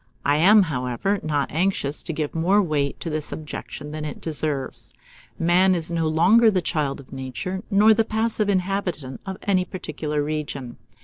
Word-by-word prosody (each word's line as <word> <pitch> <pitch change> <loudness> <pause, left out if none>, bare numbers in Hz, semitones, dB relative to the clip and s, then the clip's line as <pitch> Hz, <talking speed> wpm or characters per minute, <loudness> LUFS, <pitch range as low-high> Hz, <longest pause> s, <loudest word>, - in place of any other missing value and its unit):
I 145 +1 +3
am, 200 +6 +7
however, 140 - -1
not 145 -2 -1
anxious 160 -3 0
to - - -4
give 155 -2 -3
more 180 +5 +3
weight 150 -7 0
to 165 - -3
this 155 -1 -3
objection 150 -1 -7
than 155 0 -5
it 150 -2 -5
deserves. 150 -4 -3 0.5
Man 180 +3 +4
is 170 -1 -3
no 165 -1 0
longer 185 +9 +5
the 195 -3 +2
child 150 -6 -1
of 140 - -13
Nature, 135 +8 -4
nor 215 +2 +6
the 225 +1 +2
passive 220 -1 -1
inhabitant 185 -8 -2
of 190 -1 -4
any 190 -2 +2
particular 155 -5 -3
region. 145 -5 -4
160 Hz, 170 wpm, -23 LUFS, 145-190 Hz, 0.5 s, am